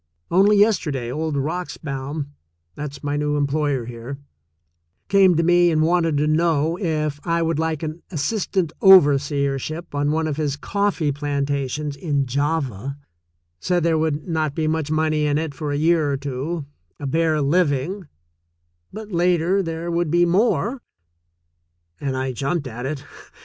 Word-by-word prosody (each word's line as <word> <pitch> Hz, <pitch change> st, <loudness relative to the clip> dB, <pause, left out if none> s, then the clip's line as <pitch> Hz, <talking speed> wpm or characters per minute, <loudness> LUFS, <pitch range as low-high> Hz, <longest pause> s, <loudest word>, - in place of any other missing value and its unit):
Only 200 Hz, +4 st, +5 dB
yesterday, 155 Hz, -, +1 dB
old 155 Hz, +2 st, -2 dB
Roxbaum 145 Hz, -2 st, -4 dB, 0.2 s
— 85 Hz, 0 st, -48 dB
that's 145 Hz, -1 st, -7 dB
my 145 Hz, 0 st, -1 dB
new 150 Hz, 0 st, 0 dB
employer 145 Hz, -3 st, 0 dB
here 120 Hz, +3 st, -7 dB, 0.5 s
— 85 Hz, +2 st, -50 dB
came 195 Hz, -3 st, +5 dB
to 165 Hz, -, +2 dB
me 175 Hz, +1 st, +4 dB
and 155 Hz, -1 st, +2 dB
wanted 165 Hz, -2 st, +2 dB
to 150 Hz, -, +2 dB
know 160 Hz, 0 st, +2 dB
if 155 Hz, -5 st, -1 dB
I 170 Hz, 0 st, 0 dB
would 165 Hz, -2 st, 0 dB
like 160 Hz, -1 st, -1 dB
an 160 Hz, +2 st, -5 dB
assistant 185 Hz, +1 st, -1 dB
overseership 145 Hz, -2 st, +4 dB
on 145 Hz, 0 st, 0 dB
one 160 Hz, +1 st, 0 dB
of 150 Hz, -2 st, -2 dB
his 150 Hz, -3 st, -1 dB
coffee 200 Hz, -4 st, 0 dB
plantations 140 Hz, 0 st, -2 dB
in 140 Hz, -3 st, -1 dB
Java, 140 Hz, -2 st, -2 dB, 0.6 s
said 180 Hz, -2 st, 0 dB
there 165 Hz, -1 st, +2 dB
would 155 Hz, 0 st, -1 dB
not 155 Hz, -4 st, -1 dB
be 160 Hz, -, 0 dB
much 155 Hz, -1 st, -1 dB
money 155 Hz, -1 st, +1 dB
in 145 Hz, 0 st, +1 dB
it 155 Hz, -2 st, -2 dB
for 150 Hz, 0 st, -4 dB
a 145 Hz, -, -1 dB
year 160 Hz, -1 st, +2 dB
or 140 Hz, -, 0 dB
two, 140 Hz, +4 st, -4 dB, 0.3 s
a 145 Hz, -, -5 dB
bare 160 Hz, +2 st, +1 dB
living, 155 Hz, +3 st, 0 dB, 0.8 s
but 215 Hz, 0 st, -8 dB
later 175 Hz, +2 st, +2 dB
there 165 Hz, -1 st, -4 dB
would 170 Hz, -1 st, 0 dB
be 175 Hz, +2 st, +4 dB
more 225 Hz, +6 st, +1 dB, 0.6 s
— 85 Hz, +1 st, -43 dB
and 135 Hz, -2 st, -2 dB
I 130 Hz, 0 st, -1 dB
jumped 140 Hz, +5 st, -2 dB
at 125 Hz, +1 st, -5 dB
it. 145 Hz, -1 st, -4 dB
150 Hz, 160 wpm, -22 LUFS, 140-170 Hz, 0.8 s, Only